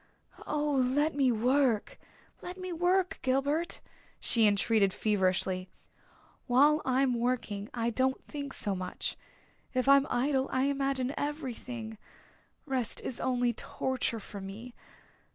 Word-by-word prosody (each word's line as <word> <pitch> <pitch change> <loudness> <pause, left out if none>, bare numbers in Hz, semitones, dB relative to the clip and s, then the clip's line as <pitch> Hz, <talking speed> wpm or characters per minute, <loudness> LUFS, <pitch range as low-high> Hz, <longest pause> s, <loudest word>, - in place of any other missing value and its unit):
"Oh, 300 0 0
let 275 +3 +2
me 270 -3 +3
work 245 0 +1 0.4
let 360 +1 -7
me 370 -1 -5
work, 365 +3 +1
Gilbert," 285 +6 0 0.4
she 225 -3 +4
entreated 205 -1 +3
feverishly. 185 -2 0 0.8
"While 290 +5 +5
I'm 260 0 +2
working 230 -4 -2
I 235 -1 -1
don't 260 +3 +1
think 285 -2 -6
so 200 -2 0
much. 185 -1 -4 0.6
If 255 +1 +1
I'm 275 0 +6
idle 265 +1 +1
I 260 - +1
imagine 275 -1 0
everything 250 -6 -5 0.7
rest 260 -6 0
is 255 - -5
only 245 -2 +1
torture 245 0 -2
for 200 -1 -9
me. 215 +6 -8
255 Hz, 120 wpm, -30 LUFS, 225-280 Hz, 0.8 s, I'm